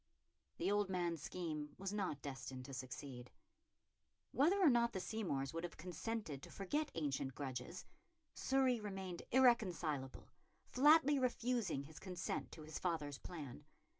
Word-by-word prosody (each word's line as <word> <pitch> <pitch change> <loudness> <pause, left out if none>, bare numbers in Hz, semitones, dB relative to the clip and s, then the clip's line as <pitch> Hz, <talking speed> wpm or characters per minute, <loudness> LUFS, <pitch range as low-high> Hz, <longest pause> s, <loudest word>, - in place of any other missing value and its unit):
The - - +1
old 205 -1 +2
man's 175 -4 0
scheme 155 -4 -4
was 195 +1 -3
not 185 -9 -2
destined 130 -2 -5
to 135 - -8
succeed. 130 -1 -6 1.0
Whether 330 +9 +4
or 345 -7 +7
not 235 -1 +3
the 190 - -1
Seymours 170 -11 -2
would 165 +1 -3
have 175 - -5
consented 180 - -4
to - - -10
forget 295 +11 -1
ancient 140 -4 -1
grudges, 135 +4 -4 0.5
Surrey 265 -2 +3
remained 190 -4 -4
irreconcilable, 180 - +3 0.4
flatly 295 +1 +6
refusing 240 - +1
his 155 +2 -11
consent 185 -2 -3
to 155 - -8
his 155 0 -5
father's 150 -6 -1
plan. 145 -5 -7
175 Hz, 135 wpm, -40 LUFS, 145-225 Hz, 1.0 s, or